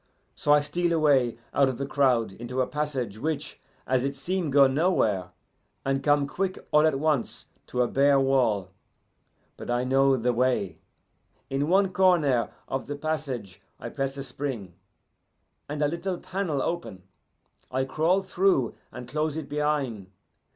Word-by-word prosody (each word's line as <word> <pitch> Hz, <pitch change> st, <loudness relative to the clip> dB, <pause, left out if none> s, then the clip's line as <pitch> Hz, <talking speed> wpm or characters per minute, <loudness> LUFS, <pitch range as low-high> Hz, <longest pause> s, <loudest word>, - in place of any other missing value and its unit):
So 145 Hz, -, 0 dB
I 150 Hz, 0 st, +6 dB
steal 175 Hz, +3 st, 0 dB
away 140 Hz, -7 st, +3 dB, 0.2 s
out 140 Hz, -1 st, +4 dB
of 130 Hz, -, -4 dB
the 140 Hz, -, -2 dB
crowd 130 Hz, -6 st, +2 dB
into 120 Hz, +5 st, -6 dB
a 130 Hz, -, +3 dB
passage 130 Hz, -9 st, -3 dB
which, 155 Hz, +1 st, -3 dB, 0.2 s
as 130 Hz, -1 st, +1 dB
it 140 Hz, +1 st, -2 dB
seem, 170 Hz, +4 st, -2 dB
go 140 Hz, 0 st, +6 dB
nowhere, 130 Hz, -, +1 dB, 0.6 s
and 135 Hz, 0 st, 0 dB
come 145 Hz, 0 st, +3 dB
quick, 185 Hz, +6 st, -2 dB
all 150 Hz, +1 st, +5 dB
at 150 Hz, -4 st, +1 dB
once, 150 Hz, -4 st, -1 dB, 0.2 s
to 125 Hz, -, +1 dB
a -, -, 0 dB
bare 140 Hz, +1 st, +4 dB
wall. 120 Hz, -8 st, +1 dB, 0.9 s
But -, -, -8 dB
I 120 Hz, +1 st, +1 dB
know 135 Hz, +1 st, +3 dB
the 125 Hz, +1 st, +1 dB
way. 115 Hz, -9 st, 0 dB, 0.7 s
In 140 Hz, +2 st, 0 dB
one 190 Hz, +1 st, +3 dB
corner 165 Hz, -11 st, +3 dB, 0.2 s
of 135 Hz, -, -3 dB
the 145 Hz, -, -4 dB
passage 140 Hz, -10 st, -4 dB, 0.2 s
I -, -, -6 dB
press 135 Hz, 0 st, -3 dB
a 135 Hz, -, -4 dB
spring, 130 Hz, -8 st, -5 dB, 1.0 s
and 150 Hz, +1 st, -2 dB
a -, -, +4 dB
little 170 Hz, +4 st, -3 dB
panel 170 Hz, -8 st, -2 dB
open. 165 Hz, -, -4 dB, 0.7 s
I 130 Hz, +1 st, -1 dB
crawl 165 Hz, +8 st, +1 dB
through 185 Hz, -9 st, +1 dB, 0.2 s
and 125 Hz, -, -9 dB
close 150 Hz, +3 st, -1 dB
it 160 Hz, -, -5 dB
behin'. 145 Hz, -9 st, -1 dB
140 Hz, 160 wpm, -26 LUFS, 125-155 Hz, 1.0 s, I